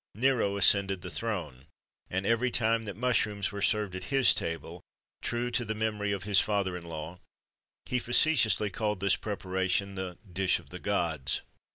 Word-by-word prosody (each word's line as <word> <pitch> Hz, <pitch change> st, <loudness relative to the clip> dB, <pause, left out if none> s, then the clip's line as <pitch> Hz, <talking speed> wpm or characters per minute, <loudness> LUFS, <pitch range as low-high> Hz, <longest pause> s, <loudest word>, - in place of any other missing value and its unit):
[XXIII 125 Hz, +6 st, +3 dB
111] 130 Hz, -, -1 dB
Nero 100 Hz, -, -3 dB
ascended 100 Hz, -2 st, +3 dB
the 90 Hz, -, -5 dB
throne, 85 Hz, -, -3 dB, 0.4 s
and 95 Hz, +1 st, -2 dB
every 115 Hz, +3 st, +2 dB
time 115 Hz, -1 st, +1 dB
that 100 Hz, -2 st, -6 dB
mushrooms 105 Hz, -5 st, +1 dB
were 100 Hz, 0 st, -5 dB
served 105 Hz, -2 st, +1 dB
at 95 Hz, 0 st, -5 dB
his 135 Hz, -2 st, +4 dB
table, 80 Hz, -3 st, -4 dB, 0.4 s
true 120 Hz, +1 st, -1 dB
to 120 Hz, 0 st, 0 dB
the 110 Hz, -1 st, -3 dB
memory 105 Hz, -2 st, -1 dB
of 100 Hz, -3 st, -2 dB
his 100 Hz, -1 st, +4 dB
father 100 Hz, -3 st, 0 dB
in 90 Hz, -, -5 dB
law, 80 Hz, +2 st, -7 dB, 0.7 s
he 125 Hz, -, 0 dB
facetiously 120 Hz, -5 st, +3 dB
called 105 Hz, +1 st, -1 dB
this 100 Hz, -1 st, +3 dB
preparation 95 Hz, -1 st, -1 dB
the 95 Hz, -2 st, -5 dB, 0.2 s
"dish 95 Hz, +1 st, +2 dB
of -, -, -15 dB
the -, -, -7 dB
gods." -, -, -1 dB
100 Hz, 180 wpm, -30 LUFS, 95-115 Hz, 0.7 s, his